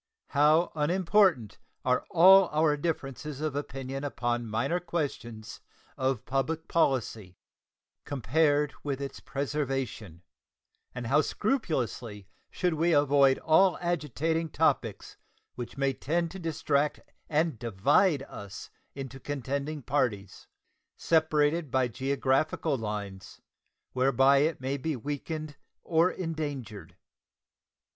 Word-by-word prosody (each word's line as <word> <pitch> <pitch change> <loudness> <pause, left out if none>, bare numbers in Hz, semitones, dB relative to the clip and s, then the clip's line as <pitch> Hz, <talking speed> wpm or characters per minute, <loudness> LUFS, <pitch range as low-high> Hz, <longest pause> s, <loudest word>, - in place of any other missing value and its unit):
How 155 +4 +3
unimportant 165 - +2 0.3
are 125 0 +1
all 185 +2 +7
our 150 -1 +2
differences 145 -2 -4
of 155 -2 -2
opinion 135 -1 -5
upon 120 -4 -2
minor 115 +11 0
questions 140 -10 -5 0.3
of 130 -3 -1
public 155 +5 -2
policy 115 - 0 0.7
compared 145 +2 +1
with 140 -2 -3
its 140 -1 -6
preservation, 135 - -4 0.7
and 125 -1 -5
how 140 +6 +4
scrupulously 125 - -2 0.2
should 180 -2 -1
we 165 +2 +2
avoid 140 -2 +4
all 175 +4 +4
agitating 165 -1 -1
topics 135 -10 -1 0.4
which 120 0 -7
may 135 -1 +1
tend 165 +5 -1
to 190 - -8
distract 150 -3 0 0.3
and 155 -5 0
divide 135 - +2
us 100 -6 -9 0.2
into 135 -1 -7
contending 140 +2 -4
parties, 110 -8 -2 0.5
separated 155 -1 +2
by 130 0 +2
geographical 135 +4 0
lines, 105 -4 -6 0.5
whereby 135 +1 +4
it 155 +1 +1
may 135 +2 -2
be 155 +2 -2
weakened 145 +3 -5 0.3
or 165 +1 +3
endangered. 140 - -5
140 Hz, 105 wpm, -28 LUFS, 125-160 Hz, 0.7 s, all